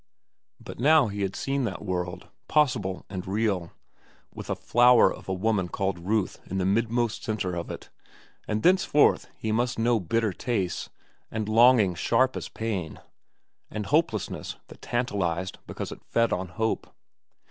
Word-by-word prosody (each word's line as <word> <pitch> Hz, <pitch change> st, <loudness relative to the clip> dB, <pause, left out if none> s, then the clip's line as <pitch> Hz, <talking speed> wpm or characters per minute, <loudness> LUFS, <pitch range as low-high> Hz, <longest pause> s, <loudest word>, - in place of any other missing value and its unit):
But -, -, -10 dB
now 145 Hz, -1 st, +5 dB
he 100 Hz, 0 st, -4 dB
had 95 Hz, -1 st, -1 dB
seen 140 Hz, 0 st, -1 dB
that 100 Hz, -1 st, -5 dB
world, 90 Hz, -2 st, -3 dB, 0.2 s
possible 125 Hz, -11 st, +1 dB
and 95 Hz, -2 st, -6 dB
real, 100 Hz, -4 st, -1 dB, 0.6 s
with -, -, -9 dB
a -, -, 0 dB
flower 120 Hz, 0 st, +5 dB
of -, -, -11 dB
a -, -, 0 dB
woman 100 Hz, -1 st, 0 dB
called 95 Hz, 0 st, -2 dB
Ruth 100 Hz, +3 st, -1 dB
in 95 Hz, -, -3 dB
the 95 Hz, -, 0 dB
midmost 115 Hz, +3 st, 0 dB
centre 105 Hz, -5 st, -2 dB
of 85 Hz, -, -4 dB
it; -, -, -8 dB, 0.6 s
and 105 Hz, 0 st, -1 dB
thenceforth 180 Hz, -5 st, +4 dB
he 110 Hz, -, -3 dB
must 120 Hz, +3 st, 0 dB
know 115 Hz, 0 st, +2 dB
bitter 105 Hz, +3 st, 0 dB
tastes, 95 Hz, -6 st, -2 dB, 0.4 s
and 110 Hz, -1 st, -3 dB
longings 110 Hz, -5 st, +5 dB
sharp 130 Hz, +3 st, +2 dB
as -, -, -5 dB
pain, 100 Hz, -8 st, -4 dB, 0.7 s
and 105 Hz, -1 st, -4 dB
hopelessness 145 Hz, -, 0 dB
that -, -, -14 dB
tantalized 95 Hz, -7 st, -2 dB
because -, -, -5 dB
it -, -, -10 dB
fed 115 Hz, 0 st, +1 dB
on 95 Hz, +1 st, -2 dB
hope. 110 Hz, +5 st, -2 dB
110 Hz, 155 wpm, -27 LUFS, 95-120 Hz, 0.7 s, now